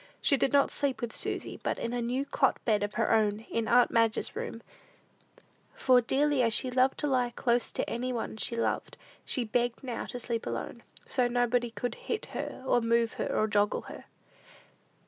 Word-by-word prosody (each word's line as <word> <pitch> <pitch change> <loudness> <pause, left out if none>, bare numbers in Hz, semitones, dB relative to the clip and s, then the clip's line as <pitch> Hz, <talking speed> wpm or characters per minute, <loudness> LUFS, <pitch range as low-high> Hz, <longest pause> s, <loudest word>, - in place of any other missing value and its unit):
She 285 - +3
did 270 - +1
not 280 -1 +4
sleep 275 -4 -1
with 235 -2 -5
Susy, - - -4
but - - -1
in 235 - -3
a 245 - -1
new 250 +4 -1
cot 270 -1 +2
bed 215 -3 +2
of 205 0 -3
her - - +2
own, 215 -1 +2
in 230 -1 -1
aunt 245 +1 +5
Madge's 230 -1 +1
room; 230 - -5 1.1
for, 255 -2 +4
dearly 280 +3 +2
as 230 -2 +3
she 255 - +2
loved 255 +1 +2
to 295 - 0
lie 250 -3 +2
close 240 0 0
to - - -2
any 250 +2 -2
one 235 -2 -3
she 235 - 0
loved, 230 - -2 0.3
she 250 - 0
begged 240 +2 -1
now 250 -3 -4
to 250 - -6
sleep 235 -1 -3
alone, 120 - -5 0.2
"so 250 -2 +1
nobody 245 0 +1
could 230 +2 -4
hit 445 - -4
her, - - -5
or 245 - +3
move 230 0 +2
her, - - 0
or 215 - +1
joggle 205 -1 +1
her." - - -10
240 Hz, 195 wpm, -29 LUFS, 230-255 Hz, 1.1 s, aunt